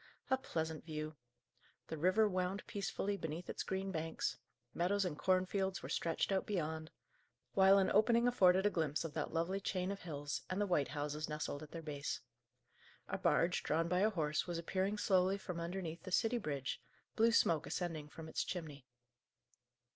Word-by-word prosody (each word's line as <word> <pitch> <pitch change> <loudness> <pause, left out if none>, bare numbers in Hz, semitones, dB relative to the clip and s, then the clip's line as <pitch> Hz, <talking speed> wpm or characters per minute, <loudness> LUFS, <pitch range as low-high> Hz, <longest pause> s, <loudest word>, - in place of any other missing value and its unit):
A 265 - +5
pleasant 160 - -3
view! 155 -1 -5 0.7
The 160 - -3
river 185 +6 +4
wound 185 0 -1
peacefully 200 0 -2
between 160 0 -4
its - - -4
green 190 0 -2
banks; 160 -2 -2 0.4
meadows 190 +3 +1
and 170 -4 -2
cornfields 185 +2 +1
were - - -5
stretched 165 +3 0
out 190 -1 +1
beyond; 160 -5 -2 0.6
while 195 0 +7
an 195 - +3
opening 235 +3 +5
afforded 190 -5 +5
a 205 - +4
glimpse 155 -3 0
of 160 - -5
that 155 - -2
lovely 170 +4 0
chain 185 -1 -1
of 200 - -5
hills, 145 -4 -4
and 185 - -1
the 205 - +3
white 175 -8 +2
houses 150 0 -3
nestled 150 -1 -3
at 155 - -9
their 165 +1 -7
base. 145 -2 -3 0.9
A - - -2
barge, - - +3
drawn 165 +2 +1
by 180 +1 +2
a 210 +3 +4
horse, 155 -6 0
was 175 -1 -2
appearing 190 +4 -1
slowly 190 -1 +3
from 180 -3 -5
underneath 170 -1 -4
the 185 - -8
city 230 +5 +2
bridge, 140 - -3 0.3
blue 230 +1 +5
smoke 165 -8 +3
ascending 160 -4 -3
from 160 +1 -9
its 160 - -1
chimney. 150 -7 -6
175 Hz, 175 wpm, -37 LUFS, 155-195 Hz, 0.9 s, while